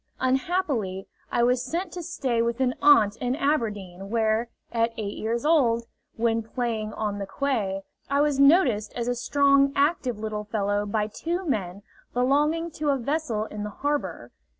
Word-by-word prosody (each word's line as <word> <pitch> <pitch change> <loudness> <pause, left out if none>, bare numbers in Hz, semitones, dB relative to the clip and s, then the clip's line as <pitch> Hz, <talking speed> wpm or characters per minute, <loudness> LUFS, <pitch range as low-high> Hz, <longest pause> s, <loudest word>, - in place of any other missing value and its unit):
Unhappily, 260 - 0 0.3
I 235 - +2
was 250 +1 +2
sent 340 +7 -3
to 355 - -6
stay 255 -7 -1
with 235 +1 -1
an 255 -1 +2
aunt 225 -8 +5
at 250 0 0
Aberdeen, 205 - -2
where, 225 +1 +1 0.2
at 230 0 +1
eight 205 -2 -4
years 230 +4 -2
old, 240 -8 +3 0.3
when 230 0 +1
playing 225 -2 -3
on 205 -2 -3
the 200 - -4
quay, 205 -8 -1 0.3
I 280 +1 +2
was 295 -2 +1
noticed 275 - +4
as 235 -1 -2
a 245 - +1
strong, 275 +2 +3
active 280 -5 +1
little 215 -1 -4
fellow 205 -1 -1
by 210 +1 0
two 340 - -3
men 200 - -2 0.3
belonging 295 +6 +2
to 300 0 -2
a 275 - +3
vessel 260 -4 -1
in 210 -1 -7
the 210 - -3
harbor. 205 - -3
235 Hz, 165 wpm, -26 LUFS, 215-280 Hz, 0.3 s, aunt